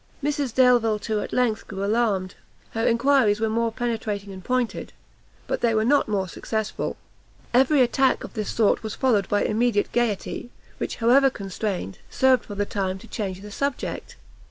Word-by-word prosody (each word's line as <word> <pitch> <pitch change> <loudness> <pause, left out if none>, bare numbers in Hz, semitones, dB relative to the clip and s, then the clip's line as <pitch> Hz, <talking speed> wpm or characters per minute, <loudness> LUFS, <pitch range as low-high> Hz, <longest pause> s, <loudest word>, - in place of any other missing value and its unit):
Mrs 290 -3 -1
Delvile, 245 -4 +4
too, 215 0 -2
at - - -5
length 240 -4 0
grew 195 -1 -5
alarmed; 205 -4 0 0.4
her 225 +1 0
enquiries 235 -3 +3
were 220 0 0
more 230 +1 0
penetrating 220 -4 -3
and 185 -1 -10
pointed, 250 0 -2 0.5
but - - -2
they 230 -2 +2
were 215 0 +2
not 285 +4 +3
more 195 -3 -1
successful; 220 +4 -3 0.6
every 265 +3 +5
attack 265 +2 +2
of - - -8
this 215 -3 -3
sort 220 -3 +2
was 220 -1 -5
followed 225 -7 +1
by 205 - +2
immediate 220 -1 +1
gaiety, 240 0 -1 0.3
which, - - -3
however 260 +4 +5
constrained, 195 - -4
served, 260 -1 +3
for 205 - -7
the 205 +1 0
time, 190 -2 -2
to 210 - -14
change 195 -5 -4
the 210 0 -10
subject. 280 +5 -3
225 Hz, 170 wpm, -24 LUFS, 205-245 Hz, 0.6 s, every